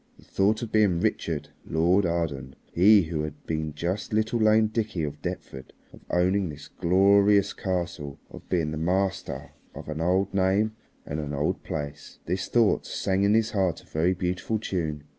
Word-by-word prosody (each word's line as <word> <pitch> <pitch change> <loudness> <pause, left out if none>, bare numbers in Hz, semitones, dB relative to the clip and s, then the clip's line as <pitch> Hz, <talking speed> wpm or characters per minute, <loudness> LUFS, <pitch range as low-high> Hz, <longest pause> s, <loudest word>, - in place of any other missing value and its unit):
The - - -19
thought 105 +4 +1
of 115 - -5
being 105 -6 +3
Richard, - - -1
Lord 85 +4 +2
Arden, 75 -6 -2 0.2
he 100 +3 +6
who 80 -1 -3
had 75 -1 -7
been 80 -2 -3
just 90 +7 -3
little 110 +2 +1
lame 110 0 +5
Dickie 110 -5 -2
of 75 0 -5
Deptford, 65 -1 -6 0.2
of - - -14
owning 90 +1 +2
this 75 -1 -9
glorious 100 +3 +4
castle, 85 -6 -3
of - - -12
being 80 -4 0
the 80 - -4
master 95 +4 -1 0.2
of - - -8
an 75 +1 -4
old 95 +3 +1
name 100 +3 +2 0.3
and 75 - -4
an 75 -1 -4
old 70 +2 -1
place, 75 -1 -6
this 90 +2 -2
thought 115 -3 +2
sang 95 0 -1
in 100 +2 +4
his 110 0 +2
heart 95 -5 0
a - - -22
very 85 +4 0
beautiful 90 +5 -2
tune. 80 -8 -3
90 Hz, 175 wpm, -26 LUFS, 80-100 Hz, 0.3 s, he